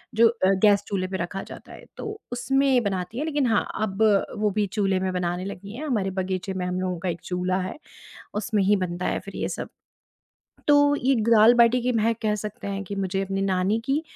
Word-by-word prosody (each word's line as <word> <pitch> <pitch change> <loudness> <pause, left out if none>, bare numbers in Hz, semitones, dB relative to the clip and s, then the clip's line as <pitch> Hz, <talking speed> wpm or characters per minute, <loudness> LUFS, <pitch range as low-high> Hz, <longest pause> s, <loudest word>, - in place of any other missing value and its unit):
जो 230 +1 +6
अ, 225 -5 +1
गैस 205 -1 +5
चूल्हे 185 -2 -1
पे 190 - -3
रखा 180 +2 -4
जाता - - -11
है, - - -12
तो 425 -1 -6
उसमें 265 0 +2
बनाती 195 +2 -3
है, 300 - -1
लेकिन 290 -4 0
हाँ, 225 -2 +2 0.2
अब 210 0 0 0.3
वो 210 0 +1
भी 205 - +1
चूल्हे 195 -3 +1
में 190 0 -1
बनाने 180 0 -2
लगी 200 +1 -7
हैं। 300 +5 -5
हमारे 210 -8 0
बगीचे 185 +1 -3
में 185 -1 -3
हम 180 0 -2
लोगों 180 -2 -2
का 185 +1 -2
एक 170 0 -4
चूल्हा 180 +1 -1
है, 185 +8 -5 0.6
उसमें 210 0 0
ही 205 +2 +4
बनता 175 +1 -5
है - - -1
फिर - - -9
ये - - -2
सब। - - -5 1.0
तो 290 0 +5
ये 270 0 +2
ग 225 0 -1
दाल-बाटी 235 +2 +6
की 250 - +1
महक 230 0 +1
कह 215 -1 +1
सकते 210 0 -6
हैं 200 0 -3
कि 200 - -6
मुझे 190 0 -1
अपनी 195 0 -2
नानी 190 +2 +1
की 280 +4 0
200 Hz, 220 wpm, -25 LUFS, 185-235 Hz, 1.0 s, जो